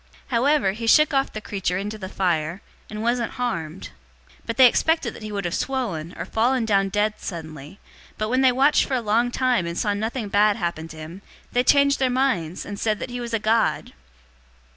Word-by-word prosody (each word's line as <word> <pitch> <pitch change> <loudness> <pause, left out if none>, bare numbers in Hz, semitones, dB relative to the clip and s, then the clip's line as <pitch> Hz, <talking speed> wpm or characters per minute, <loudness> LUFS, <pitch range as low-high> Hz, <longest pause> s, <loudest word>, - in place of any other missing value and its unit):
028:005 - - -33 0.2
However 255 -2 +2
he 225 +3 -5
shook 305 +6 +5
off 270 0 +1
the 215 - -6
creature 190 -4 -2
into 210 +2 -5
the 190 -2 -6
fire, 170 -2 -1 0.3
and 215 0 -5
wasn't 235 0 0
harmed. 160 - -4 0.4
028:006 - - -26
But 230 - -3
they 260 - +8
expected 320 +6 +1
that - - -12
he 215 0 -6
would 200 -2 -3
have 170 - -2
swollen 195 -12 -3
or - - -4
fallen 240 +2 +1
down 195 -2 +2
dead 210 +2 +1
suddenly, 160 -1 -8 0.4
but 215 - -1
when 255 +4 +1
they 260 -1 +5
watched 275 +4 +3
for 265 - -2
a - - +1
long 230 +2 +1
time 245 -7 +1
and 170 +1 -5
saw 205 - 0
nothing 220 +2 -3
bad 205 +1 +3
happen 170 -3 -3
to 160 - -12
him, 160 +5 -9 0.3
they 245 - +2
changed 280 +1 +4
their 260 -1 +2
minds, 245 -11 -1
and 205 -1 -7
said 215 -2 0
that 245 - -6
he 245 0 -4
was 235 -1 -3
a - - +2
god. 220 +2 0
215 Hz, 215 wpm, -23 LUFS, 190-250 Hz, 0.4 s, they